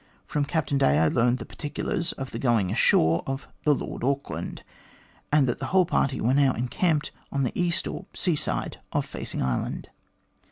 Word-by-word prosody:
From 145 -1 0
Captain 145 -2 0
Day 70 - +4
I 80 0 +4
learnt 120 +1 +3
the 115 - -7
particulars 165 +4 -3
of 135 -1 -6
the 115 - -4
going 115 -8 +2
ashore 80 +1 +4
of 135 0 -3 0.2
the 150 -1 +5
Lord - - -5
Auckland, 140 +2 -2 0.7
and 145 -2 +5
that 120 - -1
the - - -3
whole 185 -1 +4
party 140 -6 +1
were 125 +3 +2
now 135 -2 +4
encamped 150 +6 0 0.2
on 140 -1 0
the 125 - 0
east, 175 -1 0
or - - -6
sea 175 -4 +1
side, - - -2
of - - 0
Facing - - -4
Island. 65 -2 -2
135 Hz, 185 wpm, -26 LUFS, 120-150 Hz, 0.7 s, the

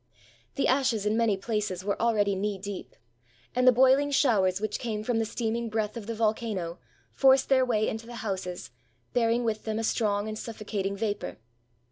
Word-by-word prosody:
The 275 - +1
ashes 255 -6 +2
in 210 +1 +2
many 225 -3 +2
places 200 -3 -3
were 200 - -1
already 210 -4 +2
knee 200 +1 -2
deep; 200 0 -7 0.6
and 250 0 +3
the - - +10
boiling 265 +3 +4
showers 205 -10 +3
which 215 0 -2
came 215 -3 -3
from 230 0 0
the 225 - +1
steaming 230 +1 -2
breath 215 0 -2
of 225 -3 -7
the 230 - -3
volcano 215 -6 -1 0.3
forced 265 0 +4
their 260 -1 +5
way 220 -4 +1
into 225 +1 -4
the 240 - -8
houses, 185 - -4 0.4
bearing 235 0 +2
with 220 -2 -1
them 220 -1 -2
a 225 - -2
strong 210 -2 0
and 215 0 -5
suffocating 205 -3 -4
vapor. 205 -1 -3
220 Hz, 180 wpm, -28 LUFS, 205-235 Hz, 0.6 s, the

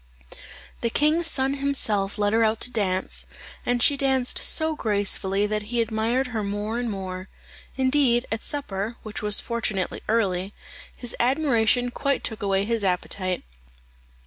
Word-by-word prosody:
The 235 - +1
king's 310 +6 +2
son 270 -2 +2
himself 220 -8 +2
led 205 0 +1
her 225 +1 +4
out 220 0 +2
to 245 - +4
dance, 190 -5 -1 0.4
and 245 -1 +2
she 285 - +5
danced 265 -2 +1
so 315 -1 +2
gracefully 200 -3 0
that 210 0 -1
he 240 0 0
admired 230 +3 0
her 220 -2 -1
more 205 +3 -2
and 245 -1 -2
more. 190 -2 -5 0.5
Indeed, 260 -2 +3
at 225 - -2
supper, 225 -6 -2
which 215 -1 -6
was 210 -1 +2
fortunately 215 -5 -2
early, 200 -3 0 0.4
his 245 - -6
admiration 245 -2 +2
quite 280 +2 -1
took 220 -1 -3
away 195 -1 +1
his 230 -1 -1
appetite. 185 0 -1
225 Hz, 145 wpm, -25 LUFS, 205-255 Hz, 0.5 s, she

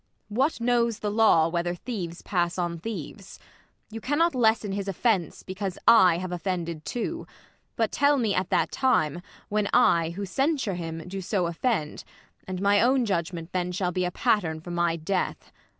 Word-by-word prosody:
What 260 +9 0
knows 235 -2 +1
the 210 - -3
law. 210 -7 +4
Whether 175 +1 -1
thieves 175 -5 -6
pass 175 -1 -1
on 175 -2 -2
thieves 195 0 -7
1 - - -26 0.5
You - - -8
cannot 325 +7 +1
lessen 220 -4 +2
his 200 0 -3
offence, 195 -3 0
because 190 0 -5
I 185 -7 +7
have 185 0 -5
offended 170 -3 -3
too: 290 +8 -4 0.5
but - - 0
tell 285 0 +3
me 225 -6 +1
at 185 -1 -1
That - - +1
time, 175 - +1 0.3
Avhen 210 -1 +1
I, 170 -9 +4
who 200 +1 -3
censure 265 - 0
him, 165 -1 -6
do 190 +1 -5
so 185 0 0
Offend; 170 -1 -2 0.4
and 185 0 -4
my 205 0 +4
own 255 +1 +3
judgment 170 -3 -3
then 180 -1 -1
shall 180 0 -1
be 185 +1 -1
A 180 - 0
pattern 180 -6 0
for 175 +2 -9
my 170 -1 +1
death. 180 +3 -3
190 Hz, 175 wpm, -26 LUFS, 175-225 Hz, 0.5 s, I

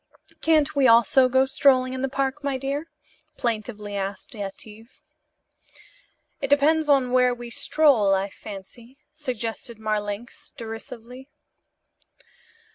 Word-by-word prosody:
"Can't 310 -3 +2
we 275 -2 +4
also 240 +3 +5
go 260 +1 +3
strolling 260 -1 +3
in 260 - -4
the 270 - -1
park, 275 +2 -2
my 280 -2 -1
dear?" 280 +4 -4 0.5
plaintively 215 -3 -3
asked 195 +3 -5
Yetive. 215 +2 -9 1.4
"It 275 - -2
depends 300 +2 +3
upon 265 -3 +3
where 250 -1 +3
we 240 -1 -9
stroll, 280 -6 +3
I 195 +1 -2
fancy," 230 +5 -11 0.2
suggested 235 -4 -3
Marlanx 215 +6 -4
derisively. 235 +3 -9
250 Hz, 115 wpm, -24 LUFS, 220-275 Hz, 1.4 s, also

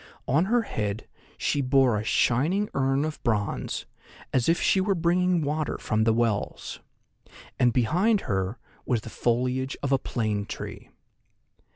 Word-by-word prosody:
On 150 +7 +3
her 235 +3 +2
head 105 - -3 0.3
she 145 - 0
bore 130 -3 +3
a 105 - -1
shining 155 - +1
urn 135 +2 +1
of 155 -1 -5
bronze, 105 -5 -1 0.5
as 125 +1 +2
if 170 - +3
she 190 - +3
were 195 +1 +1
bringing 175 0 +2
water 150 +1 -1
from 110 -1 0
the 115 - +4
wells, 115 -2 -1 0.8
and 125 -1 +4
behind 180 - +2
her 95 +3 -2 0.3
was 120 -4 0
the 115 - -9
foliage 125 +2 0
of 140 - -1
a 135 - +4
plane 105 -5 -2
tree. - - -7
130 Hz, 150 wpm, -26 LUFS, 115-165 Hz, 0.8 s, the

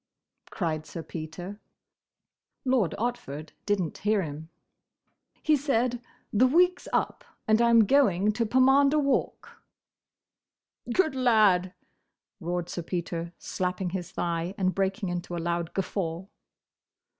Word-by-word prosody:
cried 155 -4 -3
Sir 165 - -7
Peter. 175 +6 -7 1.0
Lord 250 -10 +2
Otford 160 - -4 0.2
didn't 195 -6 -1
hear 210 -1 +1
him. 155 +1 -7 0.9
"He 310 - +4
said, 250 -4 0 0.3
'The 240 +5 +5
week 360 +6 +4
's - - -13
up, - - -1 0.2
and 220 +1 +4
I 235 - +4
'm 230 -2 +6
going 210 -6 +3
to 225 +1 -1
Pomander 270 +4 +4
Walk!'" 280 -2 -1 1.3
"Good 315 +1 +2
lad!" 215 -8 +3 0.6
roared 175 -1 -3
Sir 175 - -4
Peter, 170 -1 -4
slapping 180 0 -3
his 180 -2 -4
thigh, 170 +2 -2
and 185 -1 +1
breaking 195 0 -1
into 175 0 -4
a - - -3
loud 170 0 -2
guffaw. 180 -3 -2
195 Hz, 120 wpm, -27 LUFS, 170-240 Hz, 1.3 s, m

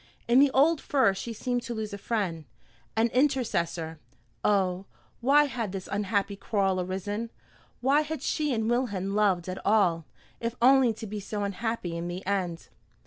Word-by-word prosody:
In 240 +2 +5
the 285 0 +6
old 285 +4 +3
fir 260 -9 +3
she 195 +5 -5
seemed 245 +2 -2
to 240 0 -5
lose 215 -1 -4
a - - -4
friend, 190 -9 -2 0.5
an 230 +1 +3
intercessor. 220 - 0 0.4
Oh, 190 -2 +1 0.3
why 280 +4 +5
had 235 -8 -3
this 190 -1 -5
unhappy 200 0 0
quarrel 195 -2 0
arisen? 205 +5 -3 0.5
Why 275 +4 +4
had 305 -2 -5
she 300 -2 0
and 220 -3 0
Wilhelm 215 -6 0
loved 195 -4 +2
at 185 0 -5
all, 180 -6 +3 0.3
if 230 0 -3
only 260 0 +6
to 220 0 -7
be 210 0 -5
so 205 +1 -4
unhappy 200 -3 -3
in 170 +1 -3
the 180 +2 -6
end? 185 -4 -2
210 Hz, 165 wpm, -28 LUFS, 190-245 Hz, 0.5 s, the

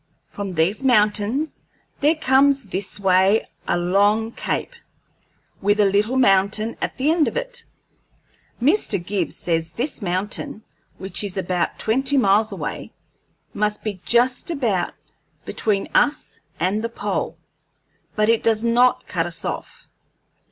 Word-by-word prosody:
From 200 -3 -6
these 180 +10 +1
mountains 220 +4 +2 0.4
there 300 +3 +3
comes 275 -1 +3
this 195 0 -3
way 195 +2 +3 0.2
a - - +1
long 205 +5 +2
cape, - - -3 0.9
with 205 +2 +2
a 205 - +5
little 205 +6 +1
mountain 205 -1 +3
at - - -3
the 275 +4 +2
end 325 -2 +2
of - - -3
it. - - -4 1.0
Mr. 275 - +2
Gibbs 185 -4 -2
says 165 -1 -2
this 255 +1 -3
mountain, 200 +3 -1 0.3
which 190 -1 -4
is 200 -2 -3
about 180 -2 -1
twenty 265 +5 +1
miles 215 -2 +3
away, - - -5 0.6
must 210 0 -1
be 200 -4 -4
just 245 - +2
about 240 - -1 0.5
between 205 -3 -1
us 295 - +1 0.2
and 200 +4 0
the 230 - -2
pole, 200 -6 -3 0.8
but 215 0 +2
it 230 0 +3
does 225 -1 +2
not 240 +2 +3
cut - - -1
us - - -2
off. - - -6
210 Hz, 135 wpm, -22 LUFS, 195-250 Hz, 1.0 s, a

